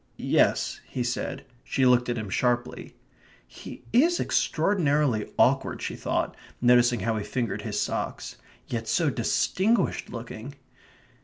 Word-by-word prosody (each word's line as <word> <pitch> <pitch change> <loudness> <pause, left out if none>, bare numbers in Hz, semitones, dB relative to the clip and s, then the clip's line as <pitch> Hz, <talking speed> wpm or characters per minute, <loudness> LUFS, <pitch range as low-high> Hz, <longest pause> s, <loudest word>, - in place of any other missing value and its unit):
"Yes," - - +1
he 125 - -3
said. 120 +1 -3 0.2
She 130 - 0
looked 125 -1 +4
at 120 - -1
him 105 -3 -5
sharply. 120 +2 -1 0.5
"He 60 - -11
is 330 +9 +4
extraordinarily 145 - +1
awkward," - - +2
she - - -4
thought, - - -2 0.2
noticing 120 -2 +4
how 110 +2 0
he 105 - -3
fingered 120 0 -3
his - - -3
socks. - - -3 0.3
"Yet 115 -2 -4
so 140 +7 +2
distinguished 190 - 0
looking." 120 +3 -8
125 Hz, 130 wpm, -26 LUFS, 115-145 Hz, 0.5 s, looked